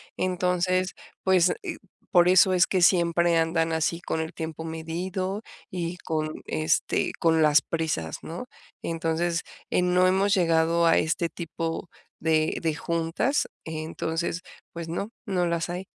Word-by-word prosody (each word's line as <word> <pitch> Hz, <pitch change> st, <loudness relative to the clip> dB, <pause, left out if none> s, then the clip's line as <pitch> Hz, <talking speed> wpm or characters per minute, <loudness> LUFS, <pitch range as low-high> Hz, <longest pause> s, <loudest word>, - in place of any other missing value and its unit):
Entonces, 185 Hz, 0 st, 0 dB, 0.3 s
pues, 185 Hz, -2 st, +4 dB, 0.6 s
por 175 Hz, -1 st, +6 dB
eso 185 Hz, 0 st, +6 dB
es 180 Hz, 0 st, +4 dB
que 185 Hz, -2 st, +1 dB
siempre 170 Hz, -1 st, +4 dB
andan 165 Hz, 0 st, +1 dB
así 160 Hz, +1 st, 0 dB
con 160 Hz, -2 st, -2 dB
el 160 Hz, +2 st, -5 dB
tiempo 160 Hz, -1 st, -5 dB
medido 180 Hz, +5 st, -3 dB, 0.3 s
y 175 Hz, -1 st, -3 dB
con, 155 Hz, -3 st, -3 dB
este, 155 Hz, +1 st, 0 dB
con 160 Hz, -1 st, +3 dB
las 150 Hz, -3 st, +5 dB
prisas, 155 Hz, -, -2 dB
¿no? 170 Hz, +9 st, -6 dB, 0.4 s
Entonces, 165 Hz, +1 st, -1 dB, 0.3 s
eh, -, -, +3 dB
no 180 Hz, 0 st, +3 dB
hemos 195 Hz, +2 st, +3 dB
llegado 165 Hz, -1 st, +3 dB
a 165 Hz, -, +5 dB
este 165 Hz, +1 st, +1 dB
tipo 165 Hz, 0 st, -4 dB, 0.3 s
de 155 Hz, 0 st, +1 dB
de 160 Hz, -2 st, 0 dB
juntas. 170 Hz, -, 0 dB, 0.2 s
Entonces, 160 Hz, +2 st, -3 dB, 0.3 s
pues, 170 Hz, -1 st, -6 dB
no, 185 Hz, +5 st, -3 dB, 0.2 s
no 185 Hz, -4 st, 0 dB
las 170 Hz, 0 st, -1 dB
hay. 180 Hz, +2 st, -5 dB
170 Hz, 140 wpm, -26 LUFS, 160-180 Hz, 0.6 s, por